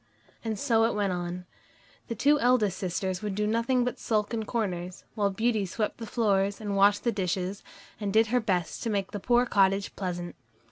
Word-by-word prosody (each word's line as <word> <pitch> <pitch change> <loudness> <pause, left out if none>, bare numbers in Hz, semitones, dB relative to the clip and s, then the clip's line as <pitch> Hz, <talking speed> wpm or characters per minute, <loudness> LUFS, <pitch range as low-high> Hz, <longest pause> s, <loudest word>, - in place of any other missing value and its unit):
And 220 -2 -2
so 225 -2 +3
it 230 - 0
went 200 -3 0
on. 175 0 -4 0.6
The 230 - -3
two 290 +7 +3
eldest 225 -7 +2
sisters 185 0 -2
would 205 -2 -3
do 210 +1 0
nothing 230 +4 +1
but 250 -1 -3
sulk 215 0 0
in 220 -1 -2
corners, 185 -6 -3
while 205 -3 +1
Beauty 220 +1 +1
swept 210 +5 -3
the 225 - -6
floors 200 -4 +1
and 205 -2 -3
washed 200 +1 +4
the 235 - +2
dishes, 190 -1 -2 0.4
and 205 -2 -2
did 220 +2 +5
her 250 - +5
best 185 -7 -1
to 230 - -2
make 200 -3 -1
the 205 - -4
poor 240 +4 +3
cottage 195 -3 +2
pleasant. 175 -2 -4
205 Hz, 195 wpm, -28 LUFS, 190-230 Hz, 0.6 s, did